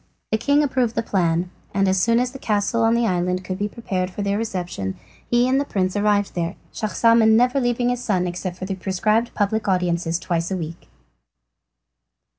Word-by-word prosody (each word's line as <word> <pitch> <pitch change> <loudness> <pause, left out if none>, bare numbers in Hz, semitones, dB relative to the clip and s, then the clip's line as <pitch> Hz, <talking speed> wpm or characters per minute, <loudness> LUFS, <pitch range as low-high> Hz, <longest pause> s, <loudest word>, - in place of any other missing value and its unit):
The 220 - +1
king 285 +4 +3
approved 255 -5 0
the 230 - 0
plan, 175 -3 0 0.2
and 195 0 +3
as 190 0 +2
soon 230 +3 +3
as 250 0 0
the 270 - -9
castle 215 0 0
on 225 +1 +4
the 235 0 +2
island 180 -2 0
could 185 0 -4
be 205 +1 -1
prepared 190 -5 -3
for 200 +2 -5
their 200 0 0
reception 180 - -3 0.3
he 240 +1 +3
and 265 +2 +2
the - - +1
prince 190 -8 -1
arrived 205 -1 +1
there, 170 +1 -2 0.2
Schahzaman 220 0 +4
never 250 +3 +3
leaving 245 0 +1
his 245 0 -2
son 185 -6 +1
except 180 0 -4
for 185 - -5
the 195 - -3
prescribed 215 +5 0
public 210 +1 0
audiences 175 -3 +1
twice 170 -1 -2
a 190 - -2
week. 165 0 -7
205 Hz, 195 wpm, -22 LUFS, 180-230 Hz, 0.3 s, on